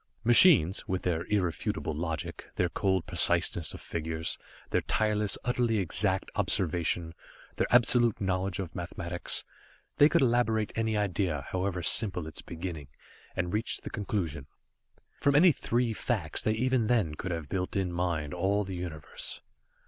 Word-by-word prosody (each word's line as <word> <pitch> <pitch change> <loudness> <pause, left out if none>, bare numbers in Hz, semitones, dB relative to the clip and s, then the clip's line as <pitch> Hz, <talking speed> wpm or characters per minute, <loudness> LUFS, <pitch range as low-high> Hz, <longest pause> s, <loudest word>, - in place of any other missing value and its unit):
Machines 120 - +6
with 95 -1 -3
their 85 -1 -1
irrefutable 90 -5 -2
logic, 80 +1 -5
their - - 0
cold 95 -3 -1
preciseness 85 -1 +4
of - - -10
figures, 80 0 -4 0.3
their - - +1
tireless, 105 -2 0
utterly 120 -2 0
exact 95 -5 0
observation, 85 -1 -1 0.4
their - - 0
absolute 120 -2 +3
knowledge 95 -1 -2
of 90 -4 -6
mathematics 85 0 -2 0.5
they 145 - +6
could - - +2
elaborate 115 -3 +1
any 110 -1 -1
idea, 90 -7 -1
however 90 -1 -2
simple 90 -2 +5
its 80 - -8
beginning, 85 -4 -7 0.5
and 90 -1 -2
reach 110 +2 -2
the - - -8
conclusion. 85 - -4 0.7
From 140 -1 +2
any 170 +4 +7
three 120 -4 -1
facts 100 -9 -2
they 110 - +1
even 125 0 0
then 110 -11 +1
could 90 +5 -6
have 80 -4 -4
built 90 +3 -3
in 95 -3 -1
mind 85 -4 -2
all 95 +4 0
the 95 -1 -6
Universe. 85 -4 -4
95 Hz, 145 wpm, -29 LUFS, 85-110 Hz, 0.7 s, any